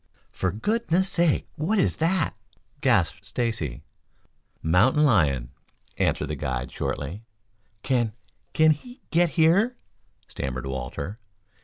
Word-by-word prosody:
"For 95 - -1
goodness' 190 - +1
sake, 170 -4 +2
what 180 +9 0
is 185 - +2
that?" 165 -1 +1 0.5
gasped 100 - +2
Stacy. 100 - -2 0.8
"Mountain 110 - +4
lion," 70 - +3 0.4
answered - - 0
the - - -2
guide 65 -1 -3
shortly. 85 +10 -4 0.6
"Can 120 -5 +1 0.4
can 155 0 +5
he 245 - -5
get 170 +1 +4
here?" 195 +10 +4 0.5
stammered 65 0 -4
Walter. 65 - -5
115 Hz, 110 wpm, -25 LUFS, -, 0.8 s, can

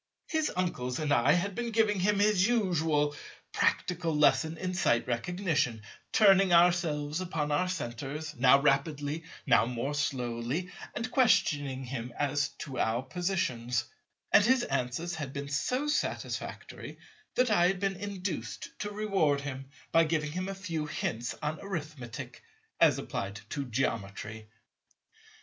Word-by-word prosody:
His 315 -1 0
uncles 125 -9 -1
and 150 -2 +1
I 120 -2 +4
had 195 +3 0
been 240 +3 -3
giving 215 -3 +2
him 205 +3 +2
his 205 -1 +4
usual 160 -10 +1 0.4
practical 170 -3 0
lesson 160 +2 +3
in 185 +2 -3
Sight 120 -10 +2
Recognition, 125 - -1 0.3
turning 195 -3 +5
ourselves 170 -3 +3
upon 160 -5 -2
our 165 +5 +1
centres, 150 0 -4
now 135 +1 +6
rapidly, 145 +2 0 0.2
now - - +4
more 125 +4 -2
slowly, 130 +4 -2 0.2
and 245 +3 -3
questioning 145 - +2
him 125 -1 -5
as 145 0 +1 0.2
to 135 -3 -6
our 115 +3 +1
positions; 130 -7 -1 0.5
and 205 - +7
his 250 +2 +4
answers 135 +6 -2
had 145 -5 -5
been 140 0 -5
so 250 - 0
satisfactory 295 - -3 0.4
that 250 -2 +3
I 175 -4 +5
had 190 0 0
been 195 -1 -1
induced 200 -1 -4
to 210 0 -3
reward 195 -9 +1
him 135 -1 -6 0.2
by 165 0 +5
giving 155 -1 -1
him 185 +4 -3
a 195 - -4
few 165 -6 -3
hints 120 -5 -3
on 150 +1 -2
Arithmetic, 155 - -6 0.4
as - - +5
applied 100 +2 -4
to 140 -2 -2
Geometry. 110 -3 -3
155 Hz, 140 wpm, -30 LUFS, 135-185 Hz, 0.5 s, and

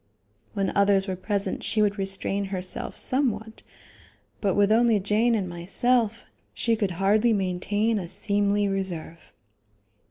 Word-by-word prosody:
When 195 -2 -2
others 200 -1 +3
were 190 - -2
present 200 +2 -2
she 220 - 0
would 205 -1 +1
restrain 195 +1 -1
herself 185 -1 -4
somewhat, 225 -5 0 0.8
but 195 -3 0
with 205 0 +3
only 230 -1 +4
Jane 215 +4 +2
and 195 -4 -1
myself, 220 +6 0 0.3
she 230 -1 +1
could 210 -3 -1
hardly 210 +4 +3
maintain 205 +3 0
a 180 - -6
seemly 205 +2 0
reserve. 185 -4 -4
200 Hz, 130 wpm, -25 LUFS, 195-220 Hz, 0.8 s, only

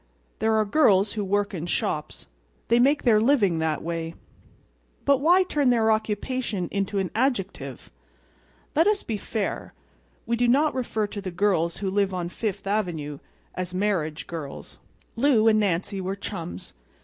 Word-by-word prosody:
There 220 +1 +2
are 215 0 +3
girls 205 -5 +3
who 210 - -2
work 205 +1 0
in 170 -2 -4
shops. 150 - -2 0.4
They 235 +1 +5
make 280 +4 +3
their 220 -4 +4
living 215 - +3
that 160 -2 -1
way. 165 0 -4 0.9
But 280 -1 +4
why 350 +6 +5
turn 295 -7 +1
their 225 -2 +3
occupation 215 -2 -1
into 200 0 -1
an 190 -2 -1
adjective? 195 - -2 0.8
Let 325 +5 +4
us 420 -1 +2
be 220 - -3
fair. 210 0 -4 0.5
We 235 - 0
do 245 +1 +2
not 290 +5 +3
refer 230 -4 -1
to 205 0 -6
the 190 - -4
girls 175 -2 +1
who 195 -2 -2
live 195 -1 +1
on 175 -1 -3
Fifth 200 0 -4
Avenue 170 -8 -2 0.3
as 185 0 -4
"marriage 180 -6 -1
girls." 155 -5 -8 0.4
Lou 235 -3 +3
and 215 -1 +5
Nancy 195 0 -1
were 190 +1 -3
chums. 170 - -7
205 Hz, 160 wpm, -25 LUFS, 180-230 Hz, 0.9 s, They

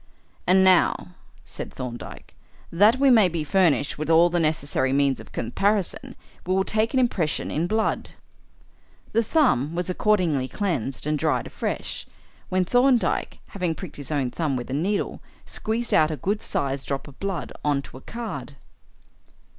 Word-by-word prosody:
"And 190 +1 +6
now," 185 -1 +4 0.4
said - - -7
Thorndyke, 120 -2 -8 0.4
"that 210 +8 +5
we 275 -1 +5
may 215 -6 +6
be 165 -2 -2
furnished 150 -4 +2
with 155 - -3
all 165 +1 +5
the 175 - +1
necessary 150 -4 +1
means 140 -1 +2
of - - -12
comparison, 195 - -1 0.3
we 185 +1 0
will 190 - +3
take 220 +5 0
an - - +4
impression 190 -11 0
in 165 +3 0
blood." 220 +3 0 1.0
The 230 - +3
thumb 185 - +2
was 180 +1 -1
accordingly 175 -10 +1
cleansed 140 - -2
and 150 0 0
dried - - +1
afresh, - - -4 0.4
when 185 0 +1
Thorndyke, 245 +3 +2
having 180 -5 -2
pricked 185 -3 -9
his 145 - -6
own 140 -5 -1
thumb 155 -3 -1
with 125 0 -5
a - - -2
needle, 190 +8 -1 0.2
squeezed 225 +2 -3
out 155 -1 +5
a 155 - -3
good 205 - -1
sized 135 -1 -3
drop 140 +1 -3
of 140 - -14
blood 195 -4 -3
on 145 -2 +1
to - - -12
a - - -13
card. 155 - -6
170 Hz, 160 wpm, -24 LUFS, 145-205 Hz, 1.0 s, And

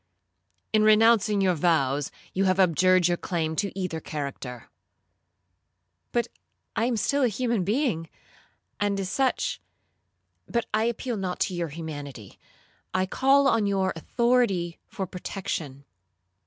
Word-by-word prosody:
'—'In 215 - +5
renouncing 215 -1 +5
your 185 -2 +3
vows, 145 -4 +1 0.2
you 195 +1 +1
have 185 0 +2
abjured 185 0 +4
your 175 0 +1
claim 160 -3 -2
to 200 -2 0
either 180 -4 -2 2.1
character.'—'But 240 -1 0 0.5
I 225 - +1
am 240 -2 0
still 280 +6 +1
a 255 - +4
human 235 -2 0
being, 205 - 0 0.7
and 205 -1 0
as 190 -1 -3
such—But 255 -2 -4
I 215 +1 +2
appeal 235 0 -2
not 185 -2 -3
to 190 - +1
your 175 -1 -2
humanity, 145 - -8 0.6
I 185 0 +2
call 270 +7 +3
on 225 -5 +2
your 195 -1 +1
authority 200 -3 +1
for 190 - -4
protection. 170 -7 -5
190 Hz, 125 wpm, -26 LUFS, 170-225 Hz, 2.1 s, In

